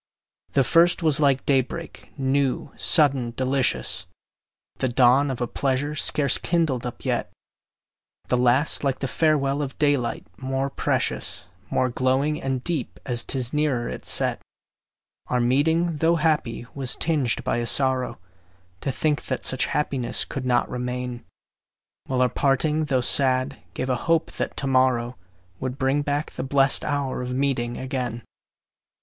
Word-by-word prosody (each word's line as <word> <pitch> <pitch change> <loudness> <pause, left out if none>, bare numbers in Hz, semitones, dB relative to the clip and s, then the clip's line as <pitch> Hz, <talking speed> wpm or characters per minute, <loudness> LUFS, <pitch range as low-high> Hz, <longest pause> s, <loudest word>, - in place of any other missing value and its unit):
The 135 - +4
first 170 +5 +4
was 155 -3 +3
like 140 -3 +2
day 135 -2 +4
break, 165 +6 -9
new, 135 -1 0
sudden, 135 -7 +3
delicious, 130 -1 0 0.7
The 130 - 0
dawn 130 +3 +4
of 130 -2 -4
a 120 - 0
pleasure 140 +3 -1
scarce 145 -1 +2
kindled 155 -8 0
up 120 - -8
yet; - - -1 1.0
The 125 - +1
last 125 +6 +2
like 135 -2 0
the 135 - -3
farewell 145 -1 +1
of 135 -2 -5
daylight, 145 -5 0
more 135 +1 -2
precious, 85 - -1 0.2
More 130 - +1
glowing 130 +5 0
and 135 -2 -2
deep, 165 -8 -3
as 120 -2 0
'tis 125 -3 -1
nearer 145 -6 0
its - - -5
set. - - +2 0.9
Our 125 - 0
meeting, 155 +7 +2
tho' 165 +3 +3
happy, 150 -8 0
was 135 -3 0
tinged 145 -7 0
by - - 0
a 120 0 -1
sorrow 130 -1 +1 0.6
To 135 - -1
think 145 +4 -1
that 130 - -3
such 130 - +2
happiness 135 -5 0
could 130 -2 -5
not 120 -1 +2
remain; 125 0 -4 0.8
While 130 -1 +1
our - - +4
parting, 145 +5 +1
tho' 135 -4 +1
sad, 130 +1 +2
gave 130 - -2
a 125 - +1
hope 165 +5 0
that - - -3
to - - -1
morrow 130 -2 +2 0.4
Would 130 0 -4
bring 135 +2 +1
back 145 +1 -2
the - - -5
blest 135 0 +2
hour 140 -3 -2
of 125 0 -4
meeting 125 -3 -1
again. 125 -3 -4
135 Hz, 150 wpm, -24 LUFS, 125-145 Hz, 1.0 s, The